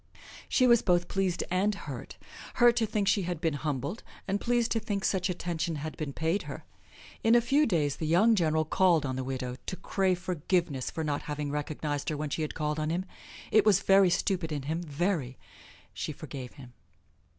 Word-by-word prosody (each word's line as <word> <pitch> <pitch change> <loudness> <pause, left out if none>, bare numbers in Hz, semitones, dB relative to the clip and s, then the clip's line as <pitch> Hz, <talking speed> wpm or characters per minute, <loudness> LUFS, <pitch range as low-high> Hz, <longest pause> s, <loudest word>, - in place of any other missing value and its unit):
She 255 - +4
was 235 -2 +6
both 175 -2 +2
pleased 190 -3 0
and 195 +3 +2
hurt 140 -10 -8 0.4
hurt 240 -1 +6
to 225 -2 +2
think 205 -1 -1
she 200 +1 +3
had 175 -2 -3
been 165 -2 0
humbled, 145 - -3 0.3
and 200 +1 -1
pleased 240 -1 +1
to 225 - +2
think 205 -3 -3
such 185 -1 +1
attentions 170 -2 -2
had 155 +2 -5
been 150 -3 -4
paid 165 +7 0
her. - - -7 0.6
In 225 +1 +5
a - - +7
few 280 +5 +3
days 150 -8 +1
the 155 - -3
young 195 +8 +5
general 160 -5 +2
called 170 -2 +3
on 130 -1 -2
the 130 - -3
widow 125 -1 -4
to - - -3
crave 185 0 0
forgiveness 170 -6 -1
for 160 - -4
not 145 -2 -1
having 145 -1 -3
recognized 150 0 -3
her 155 - -2
when 150 -1 -4
she 160 - -2
had 155 - -3
called 150 0 -1
on 155 0 -1
him. 175 +3 -1 0.5
It 215 - +6
was 205 -3 +4
very 195 -1 +5
stupid 180 -2 0
in 145 -2 -3
him, 160 +4 -2
very! 150 -4 -2 0.6
She - - -4
forgave 130 -3 -8
him. 125 -3 -13
170 Hz, 200 wpm, -29 LUFS, 150-195 Hz, 0.6 s, a